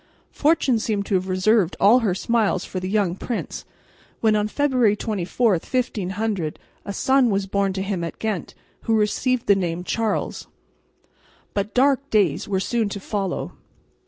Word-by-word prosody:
Fortune 285 Hz, -6 st, +2 dB
seemed 210 Hz, -2 st, -1 dB
to -, -, -3 dB
have 190 Hz, 0 st, +1 dB
reserved 185 Hz, 0 st, +2 dB
all 220 Hz, +6 st, +6 dB
her 205 Hz, -7 st, 0 dB
smiles 220 Hz, -3 st, 0 dB
for 185 Hz, -, -4 dB
the 185 Hz, 0 st, -4 dB
young 200 Hz, -4 st, +1 dB
prince, 235 Hz, +4 st, -5 dB, 0.5 s
when 220 Hz, -1 st, +3 dB
on 210 Hz, 0 st, +1 dB
February 250 Hz, -4 st, +2 dB
24, 215 Hz, +2 st, 0 dB
1500, 200 Hz, -3 st, -2 dB, 0.3 s
a 200 Hz, -, -4 dB
son 265 Hz, +4 st, +3 dB
was 195 Hz, -1 st, 0 dB
born 195 Hz, 0 st, 0 dB
to 190 Hz, 0 st, -2 dB
him 195 Hz, -3 st, -2 dB
at 165 Hz, -, -5 dB
Ghent, 215 Hz, -5 st, -3 dB, 0.3 s
who 225 Hz, -, +2 dB
received 230 Hz, +3 st, +1 dB
the 200 Hz, -, +6 dB
name 175 Hz, -2 st, -2 dB
Charles. 220 Hz, +2 st, -2 dB, 1.1 s
But 200 Hz, +1 st, -3 dB
dark 275 Hz, +1 st, +3 dB
days 200 Hz, -9 st, +2 dB
were 195 Hz, -2 st, 0 dB
soon 225 Hz, +1 st, 0 dB
to 200 Hz, -, -5 dB
follow. 195 Hz, -2 st, -3 dB
210 Hz, 160 wpm, -23 LUFS, 190-230 Hz, 1.1 s, all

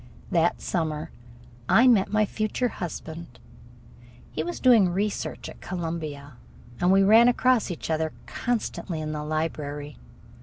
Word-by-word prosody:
That 170 Hz, 0 st, +2 dB
summer 160 Hz, -2 st, -2 dB, 0.6 s
I 240 Hz, -, +6 dB
met 220 Hz, -7 st, +4 dB
my 215 Hz, 0 st, +3 dB
future 215 Hz, +4 st, -1 dB
husband. 165 Hz, -, -7 dB, 0.9 s
He -, -, -3 dB
was 175 Hz, +2 st, -4 dB
doing 230 Hz, -8 st, +5 dB
research 200 Hz, +4 st, -3 dB
work -, -, -7 dB
at -, -, -23 dB
Columbia, 155 Hz, -6 st, -5 dB, 0.4 s
and 175 Hz, +1 st, +3 dB
we 195 Hz, +1 st, +5 dB
ran 225 Hz, +4 st, +7 dB
across 245 Hz, -2 st, +3 dB
each 175 Hz, -, -5 dB
other 160 Hz, 0 st, 0 dB
constantly 215 Hz, -7 st, -3 dB
in 155 Hz, 0 st, -4 dB
the 150 Hz, -1 st, -4 dB
library. 150 Hz, -2 st, -4 dB
170 Hz, 140 wpm, -26 LUFS, 155-215 Hz, 0.9 s, ran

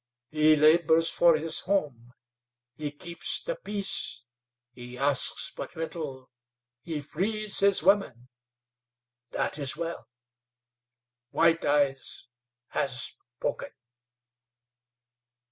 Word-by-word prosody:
He 155 Hz, 0 st, +4 dB
labors 160 Hz, +2 st, +4 dB
for 170 Hz, -2 st, +4 dB
his 160 Hz, +1 st, -1 dB
home; 145 Hz, -11 st, -2 dB, 0.6 s
he 150 Hz, +2 st, -4 dB
keeps 170 Hz, +4 st, -2 dB
the -, -, -3 dB
peace; 200 Hz, -, -2 dB, 0.5 s
he 125 Hz, 0 st, -10 dB
asks 140 Hz, 0 st, +2 dB
but -, -, -7 dB
little; 150 Hz, -6 st, -6 dB, 0.5 s
he 155 Hz, -1 st, -4 dB
frees 205 Hz, +8 st, -1 dB
his 200 Hz, -4 st, +4 dB
women. 175 Hz, -, +2 dB, 1.0 s
That -, -, -2 dB
is 140 Hz, 0 st, -1 dB
well. 170 Hz, 0 st, -5 dB, 1.2 s
White 165 Hz, +2 st, +2 dB
Eyes 140 Hz, -3 st, 0 dB, 0.4 s
has 130 Hz, -2 st, -1 dB, 0.3 s
spoken." -, -, -3 dB
155 Hz, 95 wpm, -28 LUFS, 140-170 Hz, 1.2 s, He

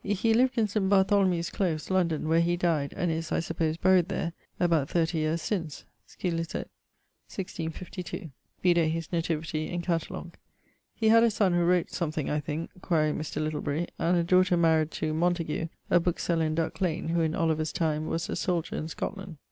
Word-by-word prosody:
He 205 Hz, +3 st, +1 dB
lived 250 Hz, +2 st, +3 dB
in 220 Hz, -2 st, +3 dB
St. 200 Hz, -1 st, 0 dB
Bartholomew's 190 Hz, -3 st, +3 dB
close, 170 Hz, -4 st, -1 dB
London, 170 Hz, -5 st, +1 dB
where 165 Hz, +1 st, +4 dB
he 175 Hz, +1 st, +1 dB
dyed, 160 Hz, -5 st, 0 dB
and 175 Hz, -3 st, 0 dB
is, 160 Hz, 0 st, -3 dB
I -, -, +2 dB
suppose, 160 Hz, -1 st, -1 dB
buried 185 Hz, 0 st, +4 dB
there, 170 Hz, -4 st, -2 dB, 0.3 s
about 165 Hz, -5 st, +2 dB
30 165 Hz, -1 st, +1 dB
yeares 155 Hz, +1 st, 0 dB
since[H], 165 Hz, -8 st, -3 dB, 0.2 s
scil. 175 Hz, -3 st, -3 dB
1652. 165 Hz, 0 st, -7 dB, 0.3 s
Vide 175 Hz, -1 st, +4 dB
his 165 Hz, -1 st, -3 dB
nativity 160 Hz, -2 st, -1 dB
in 175 Hz, -1 st, -3 dB
Catalogue[I]. 170 Hz, 0 st, -3 dB, 0.6 s
He 220 Hz, -1 st, +2 dB
had 230 Hz, +1 st, +7 dB
a 230 Hz, -, +5 dB
sonne 200 Hz, -4 st, +2 dB
who 175 Hz, 0 st, +3 dB
wrote 175 Hz, 0 st, +2 dB
something, 155 Hz, -4 st, -2 dB
I 150 Hz, -, +1 dB
thinke 150 Hz, +3 st, -4 dB
(quaere 155 Hz, -5 st, +1 dB
Mr. 155 Hz, -1 st, -4 dB
Littlebury); 155 Hz, +1 st, -2 dB
and 175 Hz, +2 st, +2 dB
a 170 Hz, -, +2 dB
daughter 185 Hz, +1 st, +4 dB
maried 160 Hz, -2 st, +3 dB
to... 155 Hz, 0 st, -2 dB
Montague, 165 Hz, -1 st, 0 dB, 0.2 s
a -, -, +6 dB
bookeseller 170 Hz, -1 st, 0 dB
in 155 Hz, -, -1 dB
Duck 165 Hz, +3 st, -2 dB
lane, 165 Hz, -3 st, -1 dB
who 170 Hz, 0 st, +1 dB
in 160 Hz, 0 st, 0 dB
Oliver's 160 Hz, -2 st, 0 dB
time 155 Hz, -2 st, -1 dB
was 165 Hz, +1 st, -2 dB
a -, -, -3 dB
soldier 175 Hz, -4 st, -1 dB
in 155 Hz, -, -3 dB
Scotland. 190 Hz, 0 st, -5 dB
170 Hz, 180 wpm, -28 LUFS, 160-180 Hz, 0.6 s, had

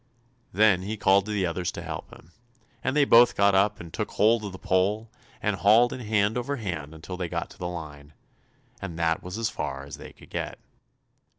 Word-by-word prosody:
Then 100 Hz, -2 st, +4 dB
he 105 Hz, +4 st, -4 dB
called 100 Hz, 0 st, +3 dB
to -, -, -3 dB
the 100 Hz, -3 st, 0 dB
others 90 Hz, +1 st, -2 dB
to -, -, -6 dB
help 80 Hz, -3 st, -6 dB
him, 80 Hz, -, -16 dB, 0.5 s
and 130 Hz, -, 0 dB
they 150 Hz, -1 st, +5 dB
both 120 Hz, -1 st, +6 dB
got 100 Hz, 0 st, +4 dB
up 100 Hz, +2 st, +2 dB
and 85 Hz, 0 st, -10 dB
took 105 Hz, -, -3 dB
hold 110 Hz, +1 st, +3 dB
of 100 Hz, -, -5 dB
the 95 Hz, -, -9 dB
pole 100 Hz, +5 st, 0 dB, 0.3 s
and 105 Hz, -2 st, 0 dB
hauled 110 Hz, +5 st, +5 dB
in -, -, -6 dB
hand 110 Hz, 0 st, +1 dB
over 140 Hz, +4 st, -2 dB
hand 80 Hz, -, -6 dB
till 90 Hz, +2 st, -6 dB
they 90 Hz, -2 st, -3 dB
got -, -, -4 dB
to -, -, -15 dB
the 90 Hz, -, -3 dB
line, 75 Hz, -4 st, -8 dB, 0.7 s
and 85 Hz, -4 st, -6 dB
that 80 Hz, -1 st, +1 dB
was 90 Hz, +3 st, -6 dB
as 115 Hz, -1 st, -1 dB
far 65 Hz, 0 st, -4 dB
as 70 Hz, -, -9 dB
they -, -, -10 dB
could -, -, -18 dB
get. -, -, -4 dB
95 Hz, 215 wpm, -26 LUFS, 85-110 Hz, 0.7 s, both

